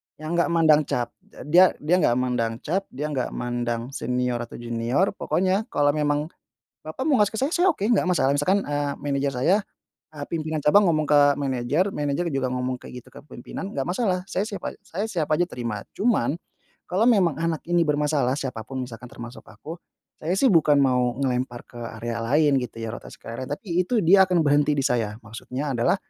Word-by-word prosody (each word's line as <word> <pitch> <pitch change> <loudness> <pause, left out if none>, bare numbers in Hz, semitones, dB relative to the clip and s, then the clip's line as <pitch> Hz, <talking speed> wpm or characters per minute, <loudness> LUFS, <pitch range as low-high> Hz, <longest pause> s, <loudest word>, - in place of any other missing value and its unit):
yang 155 +2 -7
enggak - - +3
mandang 160 -3 +4
cap. 120 -1 -2 0.2
Eee, - - -9
dia 180 +1 +6
dia 170 +4 +3
enggak 120 - +3
mandang 125 -3 0
cap, 190 +5 -1
dia 150 +3 -5
enggak 130 -3 -2
mandang 120 0 -3
senior 125 -2 -1
atau 120 - -7
junior, 120 +9 0
pokoknya 190 +2 0
kalau 145 0 +2
memang 150 +1 -1 0.5
bapak 155 +11 -7
mau 270 - +4
ngasih 210 0 +2
ke 220 - -3
saya, 275 - +1
saya 360 +2 +4
oke, - - -22
enggak 220 -5 +3
masalah. 170 -7 +2
Misalkan, 190 +7 +2
eee, 145 -1 -2
manajer 140 -1 -1
saya, 135 +10 +3 0.5
eee, 145 -2 -7
pimpinan 155 -1 -3
cabang 175 +6 +4
ngomong 155 -2 +1
ke 145 -1 +4
manajer, 140 +7 0
manajer 150 +2 -1
juga 130 -2 0
ngomong 125 0 -3
kayak 125 -1 -10
gitu - - -19
kepemimpinan, 150 +7 -8
enggak 135 - 0
masalah 185 -2 -1
saya 195 - -2
siap 200 -3 -5
a - - -3
saya 200 +6 -4
siap 165 -9 -2
aja 175 +3 +2
terima. 115 - -5
Cuman 205 - +1 0.6
kalau 195 +6 +2
memang 180 - +3
anak 165 -1 -1
ini 175 -1 +3
bermasalah, 145 -3 +1
siapa 125 -6 -4
pun 130 -1 -5
misalkan 115 +1 -10
termasuk 120 +1 -10
aku, 165 +3 -10 0.4
saya 165 +4 -1
sih 265 - +3
bukan 150 -4 +4
mau 125 -2 +1
ngelempar 125 -2 -2
ke 120 - -12 0.2
area 115 0 -3
lain 140 +2 +3
gitu 125 -2 -6
ya, 115 -1 -4
rotasi - - -10
karyawan, 115 +3 -6
tapi 180 -2 -1
itu 230 -5 +1
dia 190 +3 +6
akan 180 -2 +2
berhenti 145 +1 +3
di 135 - +1
saya. 115 -5 0
Maksudnya 125 +5 -5
adalah 120 +10 +2
145 Hz, 195 wpm, -24 LUFS, 125-175 Hz, 0.6 s, dia